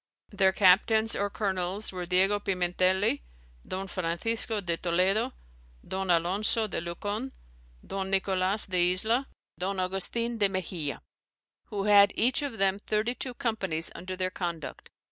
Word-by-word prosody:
Their 195 -2 +3
captaines 215 +4 +4
or 200 0 0
colonels 195 0 -2
were 180 -2 -5
Diego 190 +3 +3
Pimentelli, 185 - +1 0.5
Don 190 +1 -4
Francisco 195 +5 -2
de 175 -4 -1
Toledo, 185 +5 +1 0.6
Don 190 0 -3
Alonco 190 +6 +2
de 190 - -3
Lucon, 205 +9 -4 0.5
Don 195 -1 -4
Nicolas 190 +1 +1
de 180 -1 +2
Isla, 230 +8 0 0.3
Don 190 +1 -2
Augustin 205 +6 +1
de 200 -1 +4
Mexia; 175 -6 -4 0.6
who 205 -3 -4
had 200 -1 +6
each 255 +6 +3
of 280 -6 -4
them 195 0 +2
thirty 215 +3 0
two 250 -1 -5
companies 195 - -1
under 185 +1 -6
their 185 0 -2
conduct. 170 -5 -5
195 Hz, 135 wpm, -28 LUFS, 180-215 Hz, 0.6 s, had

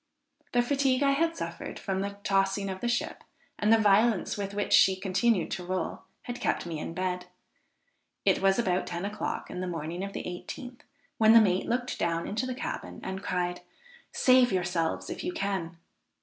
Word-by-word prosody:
The 240 0 +4
fatigue 275 0 +2
I 275 - +4
had 330 +4 +1
suffered - - -5
from 190 -1 -2
the 200 0 -4
tossing 195 0 +1
of 190 - -7
the 240 - -1
ship, 240 0 -1 0.4
and 210 +1 +3
the 225 - +7
violence 215 0 +3
with 200 -1 -4
which 205 - 0
she 190 - +6
continued 190 +1 +1
to 185 - -3
roll, 185 +1 -3 0.2
had 245 0 -6
kept - - 0
me 165 -3 -4
in 165 - -5
bed. 180 -1 -2 1.0
It - - +3
was 195 0 +4
about 185 -6 +1
ten 175 +2 -3
o'clock 205 +1 -4
in - - -5
the 185 - -3
morning 170 +1 -4
of 200 0 -5
the - - -4
18th, 245 +8 -7 0.4
when 220 0 +7
the 230 - +10
mate 190 -4 +2
looked 245 +1 -1
down 170 0 0
into 225 +5 -2
the 255 - -3
cabin - - -5
and 190 0 -4
cried, 180 -1 -2 0.5
"save 255 -1 +5
yourselves 175 -3 -1
if - - -5
you 360 - -2
can!" 190 - -3
195 Hz, 190 wpm, -29 LUFS, 180-240 Hz, 1.0 s, the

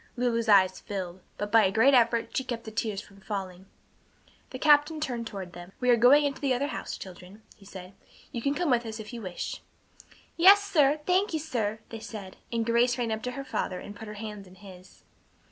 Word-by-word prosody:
Lulu's 235 -2 0
eyes 190 -2 +5
filled, 185 -2 -6 0.2
but 205 0 -4
by 225 -1 +6
a 190 - +2
great 230 +7 +4
effort 235 -2 +2
she 265 - 0
kept 240 -3 -5
the 220 - -8
tears 210 -2 -2
from 200 -1 -18
falling. 190 -2 -6 0.8
The 255 - -7
captain 300 +2 +4
turned 240 -6 -3
toward 190 -5 -7
them. 175 +2 -11
"We 250 -1 +3
are - - +7
going 260 +6 +6
into 280 -1 -3
the 270 -3 +1
other 280 +3 -1
house, - - -5
children," 185 +3 -12
he 200 - -19
said. 190 -1 -10 0.4
"You 235 - -4
can 280 +4 0
come 345 -4 0
with 240 -1 +2
us 220 -1 -7
if 220 +2 -9
you 235 - -6
wish." 185 -4 -5 0.8
"Yes, 395 +4 +7
sir. 300 -6 +2
Thank 375 +2 +2
you, 315 - 0
sir," 220 -8 -3
they 225 - -7
said, 200 -4 -9
and 230 -1 -1
Grace 235 +1 +2
ran 225 -3 -2
to 250 - -4
her 275 +1 -6
father 185 -7 -3
and 205 - -9
put 220 +2 -9
her 210 - -8
hand 210 -2 -8
in 180 - -16
his. 190 -2 -15
225 Hz, 215 wpm, -28 LUFS, 200-260 Hz, 0.8 s, are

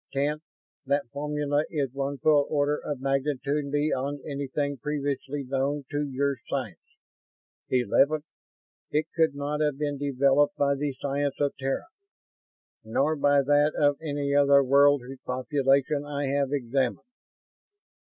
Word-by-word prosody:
"Tenth, 145 +2 0 0.5
that 140 0 +1
formula 145 0 -1
is 140 -5 -2
one 140 +1 -3
full 145 +1 +3
order 145 0 +1
of 145 -3 -4
magnitude 140 +1 -1
beyond 145 -1 -1
anything 140 0 -3
previously 145 -1 -3
known 135 +2 -1
to 145 -1 -1
your 140 +1 0
science. - - -3 0.9
Eleventh, 140 +4 +2 0.6
it 150 +1 +1
could 160 -3 +2
not 145 +1 -2
have 150 -2 +1
been 145 -1 -2
developed 140 +1 +2
by 140 0 +2
the 140 0 -2
science 140 0 -1
of 145 -1 0
Terra, 135 0 -2 1.0
nor 140 +8 +1
by 145 -1 +3
that 145 +2 +3
of 145 -1 +2
any 145 -2 -2
other 140 -1 +5
world 140 0 +4
whose 130 +1 -9
population 135 +2 +1
I 145 -1 -3
have 140 -1 0
examined." 130 -2 -1
140 Hz, 135 wpm, -27 LUFS, 135-145 Hz, 1.0 s, other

